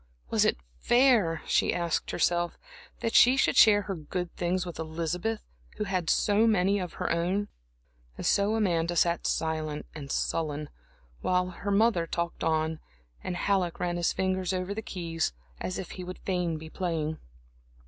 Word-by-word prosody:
Was -, -, +3 dB
it -, -, +2 dB, 0.2 s
fair, 235 Hz, -, +3 dB
she -, -, +2 dB
asked 170 Hz, -2 st, -1 dB
herself, 175 Hz, 0 st, 0 dB, 0.4 s
that 230 Hz, -, -1 dB
she 255 Hz, +2 st, +7 dB
should -, -, +3 dB
share 205 Hz, -2 st, +7 dB
her 195 Hz, -, -3 dB
good 175 Hz, +1 st, -5 dB
things 180 Hz, +1 st, -1 dB
with 175 Hz, -3 st, -7 dB
Elizabeth, 170 Hz, +7 st, -2 dB, 0.3 s
who -, -, -1 dB
had 185 Hz, -5 st, -1 dB
so 215 Hz, +2 st, +3 dB
many 200 Hz, -1 st, +3 dB
of 180 Hz, -2 st, -5 dB
her -, -, -2 dB
own? 180 Hz, +5 st, 0 dB, 0.7 s
And -, -, -5 dB
so 200 Hz, +2 st, +3 dB
Amanda 175 Hz, -5 st, +1 dB
sat 170 Hz, 0 st, +2 dB
silent 155 Hz, -2 st, -2 dB
and 140 Hz, -3 st, -7 dB
sullen, 150 Hz, -2 st, -1 dB, 0.5 s
while 180 Hz, 0 st, +1 dB
her 200 Hz, +3 st, -5 dB
mother 200 Hz, -4 st, +3 dB
talked 170 Hz, +1 st, -3 dB
on, 160 Hz, 0 st, 0 dB, 0.4 s
and 180 Hz, -, -3 dB
Halleck 185 Hz, -3 st, 0 dB
ran 175 Hz, -1 st, -1 dB
his 175 Hz, -, +1 dB
fingers 185 Hz, -1 st, -1 dB
over 185 Hz, +2 st, -2 dB
the 220 Hz, -, -4 dB
keys, 165 Hz, -, -3 dB, 0.3 s
as 185 Hz, -, -3 dB
if 190 Hz, -, -6 dB
he 185 Hz, -, -7 dB
would 185 Hz, +1 st, -7 dB
fain 180 Hz, -4 st, -1 dB
be 160 Hz, +1 st, -9 dB
playing. 160 Hz, -4 st, -2 dB
180 Hz, 165 wpm, -28 LUFS, 165-195 Hz, 0.7 s, she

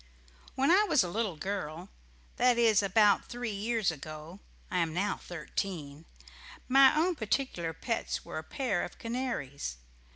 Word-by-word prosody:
When 270 Hz, +4 st, +3 dB
I 390 Hz, +4 st, +6 dB
was 300 Hz, -, +5 dB
a 175 Hz, -, -3 dB
little 210 Hz, -2 st, -1 dB
girl 175 Hz, 0 st, -4 dB, 0.5 s
that 250 Hz, -1 st, +4 dB
is 225 Hz, -3 st, +5 dB
about 200 Hz, +1 st, +4 dB
three 245 Hz, -2 st, -4 dB
years 215 Hz, -1 st, 0 dB
ago 155 Hz, +4 st, -9 dB, 0.3 s
I 180 Hz, -, +1 dB
am 165 Hz, -2 st, 0 dB
now 200 Hz, +2 st, 0 dB
thirteen 165 Hz, -4 st, -5 dB, 0.6 s
my 270 Hz, +1 st, +7 dB
own 350 Hz, +4 st, +3 dB
particular 220 Hz, -, -1 dB
pets 230 Hz, +8 st, -3 dB
were -, -, -5 dB
a -, -, -8 dB
pair 215 Hz, -, -1 dB
of 175 Hz, -, -7 dB
canaries. 230 Hz, -, -4 dB
200 Hz, 150 wpm, -30 LUFS, 165-240 Hz, 0.6 s, my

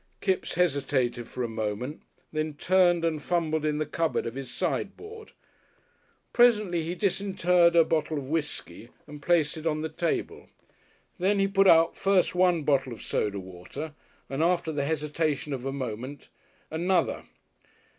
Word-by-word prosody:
Kipps 190 Hz, -2 st, -1 dB
hesitated 135 Hz, -8 st, 0 dB
for 125 Hz, -, -4 dB
a -, -, -1 dB
moment, 110 Hz, +5 st, -4 dB, 0.3 s
then 155 Hz, -1 st, -2 dB
turned 175 Hz, +1 st, +3 dB
and 155 Hz, -2 st, -1 dB
fumbled 160 Hz, -2 st, 0 dB
in 150 Hz, -1 st, 0 dB
the 155 Hz, -, -1 dB
cupboard 165 Hz, +2 st, -1 dB
of 115 Hz, -, -4 dB
his 135 Hz, 0 st, -6 dB
sideboard. 440 Hz, +1 st, -4 dB, 1.0 s
Presently 210 Hz, -8 st, +4 dB
he 165 Hz, +3 st, -3 dB
disinterred 180 Hz, -3 st, +2 dB
a 165 Hz, -, +7 dB
bottle 155 Hz, -1 st, 0 dB
of 135 Hz, -2 st, -5 dB
whiskey 145 Hz, -, -4 dB, 0.2 s
and 150 Hz, 0 st, -11 dB
placed 160 Hz, -1 st, +2 dB
it 160 Hz, +1 st, -4 dB
on 155 Hz, -1 st, 0 dB
the 160 Hz, -, -3 dB
table. 165 Hz, +2 st, -3 dB, 0.7 s
Then 195 Hz, +3 st, +2 dB
he 195 Hz, 0 st, +3 dB
put 195 Hz, 0 st, +3 dB
out 165 Hz, -2 st, +6 dB
first 195 Hz, -2 st, +2 dB
one 180 Hz, -3 st, +3 dB
bottle 135 Hz, -3 st, +1 dB
of 115 Hz, -, -10 dB
soda 100 Hz, -1 st, -1 dB
water 95 Hz, -, -8 dB, 0.3 s
and 135 Hz, +2 st, -3 dB
after 170 Hz, -1 st, +1 dB
the 145 Hz, -2 st, -1 dB
hesitation 150 Hz, -1 st, -1 dB
of 130 Hz, -1 st, -5 dB
a -, -, -1 dB
moment 130 Hz, +1 st, -6 dB, 0.4 s
another. 175 Hz, +4 st, 0 dB
155 Hz, 155 wpm, -27 LUFS, 140-175 Hz, 1.0 s, a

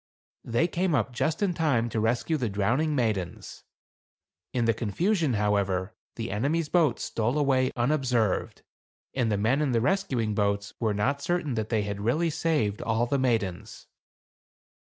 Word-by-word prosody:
They 120 Hz, +9 st, +1 dB
came 175 Hz, -1 st, 0 dB
up 120 Hz, -2 st, 0 dB
just 155 Hz, +9 st, 0 dB
in 190 Hz, -3 st, +1 dB
time 140 Hz, -9 st, +1 dB
to 110 Hz, -, -2 dB
rescue 120 Hz, +8 st, +1 dB
the 125 Hz, -7 st, -1 dB
drowning 120 Hz, +10 st, +1 dB
maidens. 105 Hz, -9 st, -2 dB, 0.9 s
In 120 Hz, -2 st, 0 dB
the 115 Hz, -, +3 dB
confusion, 155 Hz, -, 0 dB
however, 100 Hz, -1 st, 0 dB, 0.2 s
the 115 Hz, -3 st, -4 dB
enemy's 145 Hz, +10 st, 0 dB
boat 160 Hz, -9 st, +2 dB
stole 120 Hz, +5 st, -1 dB
away 130 Hz, -3 st, +2 dB
unobserved, 120 Hz, -5 st, 0 dB, 0.5 s
and 120 Hz, -4 st, 0 dB
the 105 Hz, -, +1 dB
men 115 Hz, +8 st, +2 dB
in 140 Hz, -4 st, +1 dB
the 115 Hz, -, +3 dB
rescuing 130 Hz, -, 0 dB
boats 100 Hz, 0 st, -1 dB
were 110 Hz, -3 st, 0 dB
not 140 Hz, +8 st, 0 dB
certain 170 Hz, -3 st, -1 dB
that 110 Hz, -2 st, -2 dB
they 110 Hz, -3 st, +1 dB
had 100 Hz, 0 st, -4 dB
really 155 Hz, +10 st, +1 dB
saved 150 Hz, -11 st, 0 dB
all 115 Hz, +1 st, +1 dB
the 140 Hz, +3 st, 0 dB
maidens. 110 Hz, -5 st, -1 dB
120 Hz, 155 wpm, -27 LUFS, 105-150 Hz, 0.9 s, the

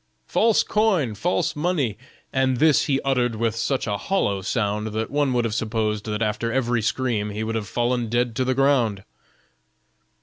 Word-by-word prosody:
false 225 Hz, -2 st, +3 dB
coin!, 195 Hz, -, +1 dB
false 170 Hz, -, -1 dB
money!' 150 Hz, -, 0 dB, 0.4 s
and 130 Hz, -1 st, +2 dB
this 155 Hz, +2 st, +4 dB
he 135 Hz, -2 st, +1 dB
uttered 125 Hz, -4 st, 0 dB
with 115 Hz, 0 st, -1 dB
such 130 Hz, +4 st, -1 dB
a 105 Hz, -2 st, -1 dB
hollow 100 Hz, -, 0 dB
sound 105 Hz, 0 st, -1 dB
that 110 Hz, +1 st, -3 dB
one 145 Hz, -1 st, +1 dB
would 120 Hz, -1 st, +1 dB
have 110 Hz, -, -2 dB
supposed 110 Hz, -2 st, -1 dB
that 105 Hz, 0 st, -2 dB
after 110 Hz, +2 st, -1 dB
every 120 Hz, -2 st, +1 dB
scream 110 Hz, -2 st, -1 dB
he 105 Hz, +1 st, -4 dB
would 110 Hz, +1 st, -3 dB
have 110 Hz, -2 st, -3 dB
fallen 120 Hz, +1 st, -1 dB
dead 120 Hz, 0 st, 0 dB
to 130 Hz, -, +1 dB
the 130 Hz, 0 st, 0 dB
ground." 125 Hz, -8 st, +2 dB
120 Hz, 175 wpm, -23 LUFS, 110-135 Hz, 0.4 s, this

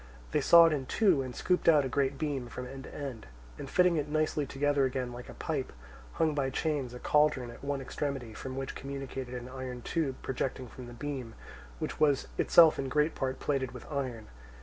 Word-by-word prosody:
They -, -, +2 dB
sawed 170 Hz, -1 st, +8 dB
in 135 Hz, -3 st, -3 dB
two 190 Hz, -10 st, +3 dB
and 130 Hz, -2 st, -6 dB
scooped 180 Hz, -2 st, +2 dB
out 150 Hz, -4 st, +5 dB
a -, -, 0 dB
great 135 Hz, +2 st, 0 dB
beam 140 Hz, -5 st, -2 dB
from 125 Hz, +2 st, -6 dB
end 135 Hz, +1 st, -8 dB
to -, -, -11 dB
end, 135 Hz, -, -6 dB, 0.3 s
and 135 Hz, -, -6 dB
fitting 180 Hz, 0 st, +4 dB
it 150 Hz, -1 st, -1 dB
nicely 155 Hz, -1 st, 0 dB
together 145 Hz, +1 st, +1 dB
again 125 Hz, -1 st, -2 dB
like 120 Hz, 0 st, -9 dB
a -, -, -9 dB
pipe, 150 Hz, -6 st, -3 dB, 0.4 s
hung 160 Hz, -2 st, +1 dB
by 140 Hz, -2 st, 0 dB
chains 135 Hz, -3 st, -2 dB
a -, -, -7 dB
cauldron 145 Hz, -5 st, +2 dB
at 120 Hz, -, -13 dB
one 140 Hz, -1 st, -2 dB
extremity, 135 Hz, -2 st, -3 dB
with -, -, -10 dB
which 135 Hz, 0 st, -4 dB
communicated 135 Hz, -2 st, -6 dB
an 125 Hz, 0 st, -6 dB
iron 130 Hz, -1 st, -6 dB
tube 155 Hz, -6 st, -1 dB
projecting 130 Hz, 0 st, -3 dB
from 125 Hz, +1 st, -10 dB
the 120 Hz, -, -9 dB
beam, 130 Hz, -3 st, -5 dB, 0.4 s
which -, -, -4 dB
was 145 Hz, -3 st, +3 dB
itself 165 Hz, -2 st, +7 dB
in 135 Hz, -1 st, -2 dB
great 150 Hz, +3 st, +2 dB
part 130 Hz, 0 st, -2 dB
plated 130 Hz, -4 st, -1 dB
with 125 Hz, -, -9 dB
iron. 130 Hz, -6 st, -3 dB
135 Hz, 205 wpm, -31 LUFS, 125-150 Hz, 0.4 s, sawed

